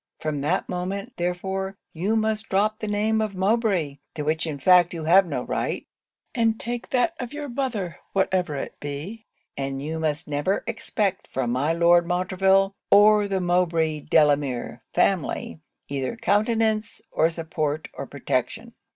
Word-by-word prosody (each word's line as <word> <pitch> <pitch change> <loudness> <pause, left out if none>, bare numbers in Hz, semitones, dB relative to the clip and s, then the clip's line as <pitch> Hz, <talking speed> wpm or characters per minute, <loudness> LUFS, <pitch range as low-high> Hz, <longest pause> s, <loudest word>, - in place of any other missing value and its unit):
From 150 -2 -2
that 160 +6 0
moment, 195 +6 -4
therefore, 190 +2 -2 0.2
you 190 +7 0
must 220 0 0
drop 210 +3 +1
the 215 - -4
name 215 +1 +1
of 215 -2 -2
Mowbray, 190 -7 +1 0.2
to 150 - -3
which 160 +3 0
in 150 -3 -3
fact 175 +4 +5
you 165 - -5
have 180 +4 +5
no - - -2
right, - - -2 0.5
and 225 -2 +1
take 240 0 -4
that 260 +6 +2
of 250 +1 -5
your 295 0 -5
mother, 235 - -3
whatever 185 -5 +1
it 140 - -6
be; 155 +11 -6 0.3
and 135 0 -3
you 155 +3 -4
must 155 +1 -1
never 150 +7 0
expect 210 -4 -2
from 125 -2 -2
my 135 +6 +1
Lord 170 +1 +4
Montreville, 190 +2 +2 0.2
or 210 0 +6
the 195 -1 0
Mowbray 170 -3 +1
Delamere 140 -6 +1
family, 180 -3 0 0.3
either 135 - -3
countenance, 220 0 +1
or 160 - +3
support, 160 -2 -3
or - - -6
protection. 145 - -3
180 Hz, 150 wpm, -24 LUFS, 155-215 Hz, 0.5 s, or